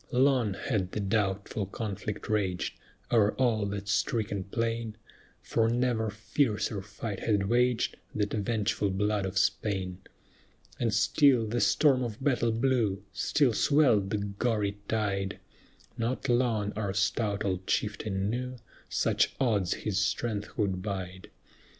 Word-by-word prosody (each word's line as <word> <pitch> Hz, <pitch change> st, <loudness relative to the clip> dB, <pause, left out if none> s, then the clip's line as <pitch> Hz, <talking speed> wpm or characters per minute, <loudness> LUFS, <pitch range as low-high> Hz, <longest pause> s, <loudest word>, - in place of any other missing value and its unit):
Long 125 Hz, -5 st, +3 dB
had 100 Hz, -5 st, -2 dB
the -, -, -2 dB
doubtful 100 Hz, 0 st, -1 dB
conflict 105 Hz, 0 st, -5 dB
raged 95 Hz, -4 st, 0 dB, 0.4 s
O'er 110 Hz, -3 st, +4 dB
all 115 Hz, -5 st, +1 dB
that 100 Hz, 0 st, -4 dB
stricken 100 Hz, -1 st, 0 dB
plain, 115 Hz, +1 st, -2 dB, 0.5 s
For 115 Hz, 0 st, +1 dB
never 120 Hz, -2 st, +1 dB
fiercer 105 Hz, -1 st, -1 dB
fight 105 Hz, +1 st, -6 dB
had 100 Hz, -3 st, +1 dB
waged 120 Hz, +1 st, +2 dB, 0.2 s
The 105 Hz, -, +2 dB
vengeful 105 Hz, -1 st, 0 dB
blood 100 Hz, +1 st, 0 dB
of 95 Hz, +1 st, -4 dB
Spain; 95 Hz, -3 st, 0 dB, 0.8 s
And 115 Hz, -2 st, +1 dB
still 115 Hz, +5 st, +4 dB
the 115 Hz, +2 st, -1 dB
storm 135 Hz, -4 st, +4 dB
of 115 Hz, -4 st, -3 dB
battle 120 Hz, -4 st, +1 dB
blew, 115 Hz, -5 st, +1 dB
Still 140 Hz, -6 st, +2 dB
swelled 120 Hz, -9 st, +3 dB
the 105 Hz, -, 0 dB
gory 100 Hz, 0 st, -1 dB
tide; 100 Hz, -3 st, -1 dB, 0.6 s
Not 120 Hz, +4 st, -1 dB
long 120 Hz, -4 st, +1 dB
our 100 Hz, -2 st, -2 dB
stout 100 Hz, +1 st, 0 dB
old 95 Hz, -1 st, -2 dB
chieftain 100 Hz, -2 st, -1 dB
knew, 125 Hz, +1 st, -3 dB, 0.3 s
Such -, -, +1 dB
odds 105 Hz, -9 st, +2 dB
his 105 Hz, -3 st, +1 dB
strength 105 Hz, 0 st, -2 dB
could 95 Hz, -4 st, 0 dB
bide. 95 Hz, -2 st, -5 dB
105 Hz, 130 wpm, -29 LUFS, 100-115 Hz, 0.8 s, O'er